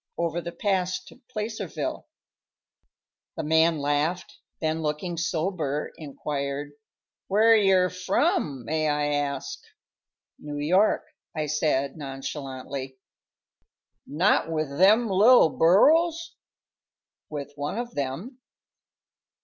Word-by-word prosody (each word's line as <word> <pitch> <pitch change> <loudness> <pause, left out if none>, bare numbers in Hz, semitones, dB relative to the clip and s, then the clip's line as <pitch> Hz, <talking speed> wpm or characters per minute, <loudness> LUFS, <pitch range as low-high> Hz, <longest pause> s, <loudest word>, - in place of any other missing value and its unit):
"Over 170 0 -1
the 170 - -6
pass 185 0 -1
to 255 - -17
Placerville." 215 -2 -4 1.3
The - - -2
man 160 +1 +3
laughed, 145 +5 -1 0.2
then, 160 0 -1
looking 155 +3 -2
sober, 165 -3 -2
inquired, 145 -1 -4 0.6
"Where 220 +3 +5
yer 190 -3 +4
from, 150 -7 0
may 155 +2 0
I 145 0 0
ask?" 145 -1 -3 0.8
"New 145 -1 -6
York," 185 +9 +2 0.3
I 155 -1 -1
said, 150 -2 0
nonchalantly. 135 -1 -6 1.1
"Not 165 +3 +2
with 155 -3 -2
them 215 +8 +5
little 210 0 +6
burros?" 320 - +3 1.0
"With 145 -2 -6
one 145 +7 -4
of 240 0 -4
them." 160 - -4
160 Hz, 100 wpm, -26 LUFS, 145-190 Hz, 1.3 s, little